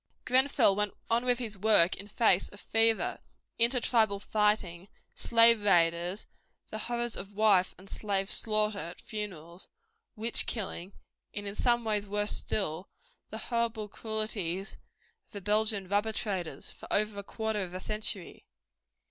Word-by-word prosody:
Grenfell 260 Hz, -5 st, +4 dB
went 210 Hz, 0 st, -1 dB, 0.2 s
on 235 Hz, +2 st, +2 dB
with 245 Hz, -1 st, +3 dB
his 220 Hz, -5 st, -4 dB
work 200 Hz, -4 st, +4 dB
in 200 Hz, -, -9 dB
face 210 Hz, -3 st, +2 dB
of 205 Hz, -, -14 dB
fever, 225 Hz, +1 st, +1 dB, 0.4 s
inter 240 Hz, +2 st, +4 dB
tribal 220 Hz, -4 st, +2 dB
fighting, 205 Hz, -4 st, 0 dB, 0.3 s
slave 230 Hz, -1 st, +5 dB
raiders, 175 Hz, 0 st, +2 dB, 0.5 s
the 215 Hz, -, -4 dB
horrors 240 Hz, 0 st, -2 dB
of 200 Hz, +1 st, -8 dB
wife 200 Hz, -4 st, +3 dB
and 190 Hz, +2 st, -15 dB
slave 195 Hz, -1 st, -2 dB
slaughter 215 Hz, -1 st, +1 dB
at 170 Hz, +2 st, -7 dB
funerals, 180 Hz, -5 st, -7 dB, 0.5 s
witch 230 Hz, +1 st, +1 dB
killing 195 Hz, -4 st, -4 dB, 0.4 s
and 205 Hz, -1 st, -5 dB
in 200 Hz, -, -4 dB
some 240 Hz, +2 st, +1 dB
ways 210 Hz, -2 st, 0 dB
worse 205 Hz, +1 st, +1 dB
still, 185 Hz, -3 st, -2 dB, 0.4 s
the 220 Hz, -, -6 dB, 0.2 s
horrible 230 Hz, -2 st, 0 dB
cruelties 210 Hz, -4 st, -3 dB, 0.5 s
of -, -, -27 dB
the 200 Hz, -, -6 dB
Belgian 210 Hz, -1 st, +1 dB
rubber 205 Hz, +3 st, 0 dB
traders 190 Hz, -7 st, -3 dB
for -, -, -13 dB
over 210 Hz, -1 st, 0 dB
a -, -, -6 dB
quarter 220 Hz, 0 st, -2 dB
of 180 Hz, -1 st, -6 dB
a -, -, -3 dB
century. 210 Hz, -3 st, -3 dB
210 Hz, 150 wpm, -30 LUFS, 195-220 Hz, 0.5 s, slave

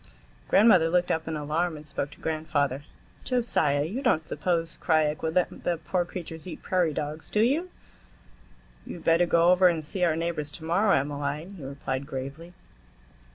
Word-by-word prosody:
Grandmother 190 Hz, -6 st, +5 dB
looked 175 Hz, +1 st, +2 dB
up 160 Hz, 0 st, -1 dB
in 160 Hz, -, -2 dB
alarm 155 Hz, +3 st, -1 dB
and 150 Hz, -, -11 dB
spoke 140 Hz, -1 st, -3 dB
to -, -, -16 dB
grandfather. 145 Hz, -4 st, -1 dB, 0.4 s
"Josiah, 160 Hz, -, +1 dB
you 205 Hz, -, -3 dB
don't 160 Hz, -, +2 dB
suppose 165 Hz, +1 st, -2 dB
Krajiek 155 Hz, -1 st, +2 dB
would 160 Hz, 0 st, -2 dB
let 180 Hz, -, 0 dB
them 175 Hz, -, 0 dB
poor 180 Hz, -2 st, 0 dB
creatures 165 Hz, -2 st, -8 dB
eat 175 Hz, -, -8 dB
prairie 180 Hz, -4 st, +1 dB
dogs, 150 Hz, +1 st, -5 dB
do 210 Hz, -, +1 dB
you?" 295 Hz, +10 st, +2 dB, 1.1 s
"You -, -, -8 dB
had 170 Hz, -, -11 dB
better 165 Hz, +1 st, +4 dB
go 170 Hz, +1 st, +4 dB
over 180 Hz, 0 st, +6 dB
and 165 Hz, -3 st, 0 dB
see 180 Hz, +4 st, -3 dB
our 165 Hz, -3 st, +3 dB
neighbors 165 Hz, -3 st, -2 dB
to 165 Hz, -, -9 dB
morrow, 195 Hz, +5 st, +3 dB
Emmaline," 145 Hz, +5 st, -3 dB
he 175 Hz, -7 st, -10 dB
replied 135 Hz, 0 st, -4 dB
gravely. 145 Hz, +6 st, -7 dB
160 Hz, 175 wpm, -27 LUFS, 150-180 Hz, 1.1 s, over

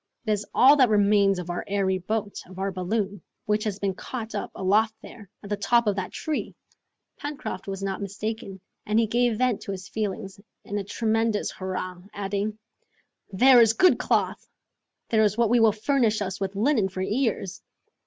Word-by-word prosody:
"It 215 Hz, -, 0 dB
is 210 Hz, 0 st, -1 dB
all 275 Hz, +4 st, +6 dB
that 255 Hz, -4 st, +5 dB
remains 200 Hz, -2 st, +4 dB
of 175 Hz, -1 st, -4 dB
our 175 Hz, -, -3 dB
airy 195 Hz, -2 st, 0 dB
boat, 205 Hz, +2 st, -3 dB
of 185 Hz, 0 st, -13 dB
our 195 Hz, +1 st, -1 dB
balloon, 195 Hz, +1 st, -2 dB, 0.2 s
which 210 Hz, 0 st, +1 dB
has 205 Hz, -3 st, -2 dB
been 200 Hz, -2 st, -1 dB
caught 225 Hz, +3 st, -6 dB
up 205 Hz, -, -3 dB
aloft 215 Hz, +4 st, +2 dB
there, 205 Hz, -5 st, -12 dB
at 200 Hz, -, -9 dB
the -, -, +2 dB
top 235 Hz, +3 st, +2 dB
of 205 Hz, -2 st, +1 dB
that 185 Hz, -1 st, -3 dB
tree!" 310 Hz, -1 st, -4 dB, 0.6 s
Pencroft 290 Hz, -10 st, -6 dB
was 195 Hz, 0 st, -4 dB
not 195 Hz, 0 st, -3 dB
mistaken, 200 Hz, 0 st, -5 dB, 0.2 s
and 215 Hz, +1 st, 0 dB
he 230 Hz, -, +3 dB
gave 235 Hz, 0 st, +1 dB
vent 250 Hz, -3 st, +1 dB
to -, -, -5 dB
his 185 Hz, -1 st, -6 dB
feelings 200 Hz, -2 st, -4 dB, 0.3 s
in 205 Hz, +1 st, -3 dB
a -, -, -3 dB
tremendous 225 Hz, +1 st, 0 dB
hurrah, 185 Hz, -1 st, -5 dB
adding, 205 Hz, +1 st, -2 dB, 0.7 s
"There 245 Hz, +5 st, +7 dB
is 225 Hz, -1 st, +5 dB
good 365 Hz, +10 st, +4 dB
cloth! -, -, 0 dB, 0.6 s
There 220 Hz, -1 st, +3 dB
is 210 Hz, 0 st, +2 dB
what 235 Hz, -2 st, +2 dB
will 225 Hz, -2 st, +5 dB
furnish 220 Hz, 0 st, +1 dB
us 190 Hz, -2 st, -3 dB
with 195 Hz, 0 st, -2 dB
linen 220 Hz, -2 st, +2 dB
for 185 Hz, 0 st, -4 dB
years. 210 Hz, -4 st, -1 dB
205 Hz, 185 wpm, -25 LUFS, 195-225 Hz, 0.7 s, There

